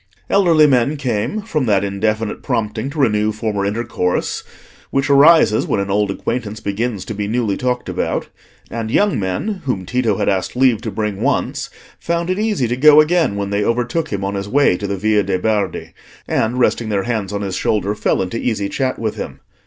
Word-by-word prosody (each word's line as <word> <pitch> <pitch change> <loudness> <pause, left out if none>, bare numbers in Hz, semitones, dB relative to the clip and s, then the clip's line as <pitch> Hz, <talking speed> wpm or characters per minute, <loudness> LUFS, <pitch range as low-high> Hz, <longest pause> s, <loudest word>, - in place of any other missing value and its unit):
Elderly 170 -6 +5
men 140 +1 +2
came 130 - -2
from 155 - -1
that 100 -2 +3
indefinite 105 +2 -1
prompting 115 +1 -2
to 150 - -9
renew 110 -6 +2
former 105 -2 -2
intercourse 100 -4 -2 0.5
which 135 +1 0
arises 140 -5 +5
when - - 0
an 100 0 -2
old 105 0 +1
acquaintance 110 +2 -3
begins 105 0 -3
to - - -5
be 105 0 -3
newly 110 -2 0
talked 125 +1 -2
about; - - -2 0.4
and 115 -1 -3
young 205 - +2
men 135 - -2
whom 100 -8 -2
Tito 115 -2 0
had - - -1
asked 95 +1 0
leave 125 -4 +3
to 115 - -4
bring 105 -2 -3
once, - - -1 0.3
found 170 +1 -1
it 185 - -1
easy 210 - 0
to 120 - -1
go 150 +3 +7
again 160 - +3
when 100 0 -3
they 100 0 +1
overtook 125 +8 -1
him 100 -2 -2
on 100 - -2
his 100 0 -4
way 140 -6 +3
to 100 +3 -4
the 100 0 -2
Via 105 +2 +2
de' 95 -2 -1
Bardi, 105 +2 -2 0.3
and, 115 +3 0
resting 120 -2 +1
their 100 -2 0
hands 110 -4 -2
on 100 0 -3
his 95 -2 -3
shoulder, 105 -1 0
fell 105 - 0
into 95 +5 -4
easy 105 -4 -1
chat 130 -1 -1
with 110 -2 -3
him. - - -6
110 Hz, 200 wpm, -18 LUFS, 100-135 Hz, 0.5 s, go